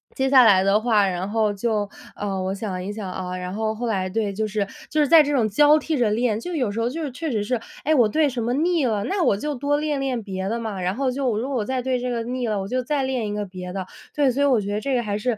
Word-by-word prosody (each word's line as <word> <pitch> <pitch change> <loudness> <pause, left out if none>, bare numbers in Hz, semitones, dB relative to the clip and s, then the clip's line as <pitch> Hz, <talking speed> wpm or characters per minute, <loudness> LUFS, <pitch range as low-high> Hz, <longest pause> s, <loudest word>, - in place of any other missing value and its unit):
接 265 0 +1
下 265 -2 +8
来 190 -4 +6
的 195 +2 +3
话， 215 -3 +3
然 185 +1 -3
后 215 -1 +1
就， 210 0 -1 0.3
呃， 195 -2 -3
我 190 +1 -2
想 195 -3 -4
一 195 - -4
想， 205 -3 -5
啊， 180 0 -4
然 180 0 -5
后 220 +1 -1
后 240 +3 -4
来 190 -4 -1
对， 205 0 -1
就 215 +2 -1
是， 210 -1 -1 0.2
就 310 - 0
是 295 - +3
在 325 +2 +8
这 295 -1 0
种 240 -6 +2
交 295 +8 +5
替 310 +1 -2
着 240 -4 +2
练， 220 0 +1
就 350 +9 -5
有 250 -9 0
时 215 - -4
候 230 +1 +1
就 320 +5 -4
是 290 - -3
确 320 +5 -4
实 215 -6 -1
是， 245 +3 -1 0.2
诶， 310 - +2
我 245 -7 +5
对 305 +8 +2
什 245 -2 -4
么 235 +2 0
腻 325 +1 +1
了， 215 -4 0
那 390 - -1
我 205 - +3
就 295 +8 -3
多 285 +2 0
练 300 -1 -1
练 260 -4 -2
别 190 -1 -4
的 230 - -1
嘛， 215 -5 -4
然 180 +2 -1
后 265 +1 0
就 265 0 -1
我 215 - -1
如 245 +5 -2
果 275 - -1
我 215 - -1
再 260 +2 -1
对 255 -1 0
这 250 +1 -3
个 235 -2 -2
腻 245 +1 -3
了， 210 -2 -1
我 195 - -5
就 255 +2 0
再 275 +2 -1
练 260 -4 -1
一 205 - -3
个 210 0 -2
别 180 -1 -8
的。 190 -1 -4 0.3
对， 285 -3 +3
所 270 +3 -1
以 - - +4
我 260 -5 +4
觉 200 0 -3
得 210 - 0
这 275 +1 -1
个 240 - +1
还 205 -2 -2
是 225 +1 -1
230 Hz, 335 characters per minute, -23 LUFS, 205-265 Hz, 0.3 s, 下